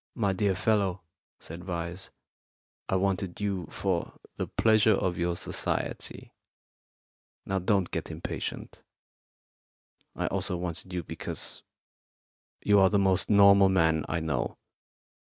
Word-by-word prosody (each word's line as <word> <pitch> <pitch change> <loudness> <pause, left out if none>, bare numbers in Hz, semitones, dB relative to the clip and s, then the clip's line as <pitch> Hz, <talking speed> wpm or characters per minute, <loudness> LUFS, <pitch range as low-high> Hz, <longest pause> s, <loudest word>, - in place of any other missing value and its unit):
"My 100 -5 +1
dear 95 0 +1
fellow," 100 -2 +1 0.4
said 85 +2 -8
Vyse, 85 0 -4 0.8
"I - - +1
wanted 95 -1 -1
you 100 -5 -2
for 95 -4 -2 0.2
the - - -3
pleasure 110 -1 +4
of 90 -2 -1
your 85 0 0
society. - - -3 1.1
Now, 95 0 -1
don't 95 -1 +1
get - - -3
impatient. - - -6 1.3
I - - -2
also 90 - -1
wanted 90 +1 -5
you 90 -1 -3
because - - -6 1.0
you 105 -1 +5
are 95 -1 +6
the 105 - +2
most 95 -2 +2
normal 100 -1 +7
man 80 -4 +3
I 85 +1 -1
know. 75 -6 -2
95 Hz, 120 wpm, -28 LUFS, 85-100 Hz, 1.3 s, normal